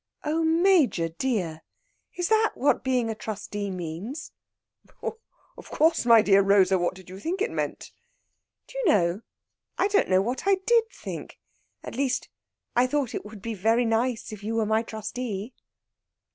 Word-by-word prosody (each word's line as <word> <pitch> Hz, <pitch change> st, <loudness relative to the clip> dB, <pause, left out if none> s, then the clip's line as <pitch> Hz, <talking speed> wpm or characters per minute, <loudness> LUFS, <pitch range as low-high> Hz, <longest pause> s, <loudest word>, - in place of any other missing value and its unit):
"Oh, 315 Hz, +2 st, 0 dB
Major 325 Hz, -, +3 dB
dear! 170 Hz, -5 st, -2 dB, 0.5 s
is 355 Hz, -1 st, -1 dB
that 440 Hz, 0 st, +3 dB
what 285 Hz, -, +2 dB
being 250 Hz, -3 st, +1 dB
a -, -, -2 dB
trustee 205 Hz, -1 st, -5 dB
means?" 185 Hz, -, -6 dB, 0.7 s
"Of 455 Hz, -, -9 dB
course, 320 Hz, -5 st, +2 dB
my 230 Hz, -2 st, +7 dB
dear 200 Hz, -1 st, +5 dB
Rosa! 195 Hz, -1 st, +4 dB
What 175 Hz, +1 st, 0 dB
did 185 Hz, -1 st, -14 dB
you 185 Hz, +1 st, -9 dB
think 345 Hz, -, -3 dB
it 425 Hz, -, 0 dB
meant?" -, -, -4 dB, 0.7 s
"Do -, -, -8 dB
you -, -, -1 dB
know, 185 Hz, -, +3 dB, 0.6 s
I -, -, +3 dB
don't 410 Hz, 0 st, +2 dB
know 185 Hz, 0 st, +4 dB
what 250 Hz, -, -3 dB
I 395 Hz, -, +6 dB
did 470 Hz, -1 st, +4 dB
think; -, -, -8 dB, 0.5 s
at -, -, -7 dB
least, 260 Hz, +1 st, -1 dB, 0.5 s
I 245 Hz, +1 st, +4 dB
thought 280 Hz, -3 st, -1 dB
it -, -, -4 dB
would 210 Hz, -2 st, -11 dB
be 230 Hz, -, -3 dB
very 225 Hz, +4 st, +2 dB
nice 230 Hz, +1 st, 0 dB
if 210 Hz, -1 st, -10 dB
you 225 Hz, +2 st, -2 dB
were 225 Hz, -1 st, +1 dB
my 220 Hz, +1 st, +2 dB
trustee." 220 Hz, 0 st, -5 dB
225 Hz, 165 wpm, -26 LUFS, 200-295 Hz, 0.7 s, my